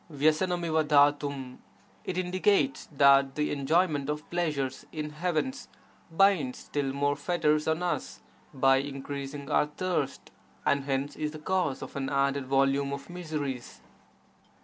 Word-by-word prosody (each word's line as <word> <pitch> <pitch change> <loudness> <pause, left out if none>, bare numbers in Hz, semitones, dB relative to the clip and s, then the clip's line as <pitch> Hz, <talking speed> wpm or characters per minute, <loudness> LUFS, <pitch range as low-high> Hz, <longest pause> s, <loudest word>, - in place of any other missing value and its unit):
^TTRffR 160 +2 +1 0.3
^RJ 135 -3 -5 0.3
— - - -32
It 180 - -3
indicates 185 -6 +1
that 140 -1 +5
the 150 0 0
enjoyment 145 0 +1
of 150 0 -3
pleasures 150 -7 -1
in 150 -1 -4
heavens 175 - -2 0.4
binds 165 -7 +3
still 140 -2 -3
more 145 +1 0
fetters 150 0 +1
on 160 +2 0
us 175 - -3 0.3
by 135 0 +4
increasing 140 +1 -5
our 150 - +3
thirst 180 +4 -3 0.3
and 140 -1 +2
hence 135 +1 -2
is 150 0 -3
the - - -7
cause 165 -3 -1
of - - -9
an 135 -1 -2
added 140 -1 0
volume 135 +1 +2
of 140 +4 -7
miseries. 150 -8 -5
145 Hz, 135 wpm, -28 LUFS, 140-165 Hz, 0.4 s, that